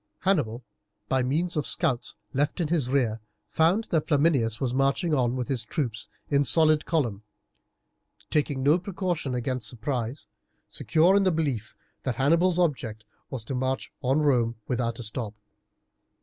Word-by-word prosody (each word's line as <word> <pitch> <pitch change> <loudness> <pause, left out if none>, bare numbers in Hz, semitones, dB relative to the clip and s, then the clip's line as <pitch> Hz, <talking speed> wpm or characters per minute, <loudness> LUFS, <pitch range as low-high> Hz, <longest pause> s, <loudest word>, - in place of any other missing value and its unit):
Hannibal, 135 - +1 0.5
by 130 0 +2
means 160 +8 0
of 150 - -1
scouts 155 -8 +1 0.2
left 145 +5 0
in 165 -4 0
his 155 -7 +1
rear, 120 -5 +1 0.3
found 165 - +2
that 160 -3 +1
Flaminius 140 -7 +2
was 130 -3 -1
marching 140 +5 +1
on 125 -3 +2
with 125 -2 -2
his 130 -5 -1
troops 115 -2 -3 0.2
in 140 -1 +3
solid 155 0 +3
column, 120 -12 0 1.1
taking 145 -3 0
no 150 +6 +4
precaution 175 -7 -2
against 125 -2 -2
surprise, 120 +2 -3 0.4
secure 170 +4 +3
in 200 - +5
the 190 - +3
belief 140 -10 -2 0.3
that 130 -3 -2
Hannibal's 170 +7 +3
object 130 -11 -1 0.2
was 125 -5 -5
to 135 - -4
march 130 +1 -2
on 135 +3 +2
Rome 120 -6 +2
without 115 -2 -1
a 120 - -6
stop. 110 -1 -4
135 Hz, 150 wpm, -27 LUFS, 120-160 Hz, 1.1 s, in